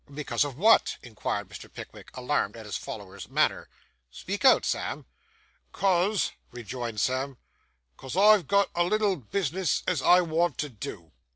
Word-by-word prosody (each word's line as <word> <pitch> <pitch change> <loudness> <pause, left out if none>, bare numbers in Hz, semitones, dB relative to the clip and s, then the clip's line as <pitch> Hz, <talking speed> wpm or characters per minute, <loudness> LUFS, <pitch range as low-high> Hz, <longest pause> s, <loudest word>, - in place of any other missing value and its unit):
'Because 140 -4 -1
of 140 -3 -5
what?' 220 +7 +4
inquired 115 -4 -4
Mr. - - -11
Pickwick, - - -11
alarmed 125 -4 -1
at 110 - -10
his 105 -4 -5
follower's - - -7
manner. - - +1 0.4
'Speak 195 - -5
out, 265 - +6
Sam.' - - -2 0.7
''Cause,' 195 +2 +1 0.2
rejoined 120 -1 -6
Sam 130 +2 -1 0.6
''cause 135 +6 -7
I've 210 -1 +6
got 200 0 +2
a 175 - +2
little 205 +1 +1
bisness 175 - -1
as - - 0
I 180 +1 +6
want 165 -3 0
to 150 - -2
do. 95 -7 -8
150 Hz, 150 wpm, -27 LUFS, 125-190 Hz, 0.7 s, out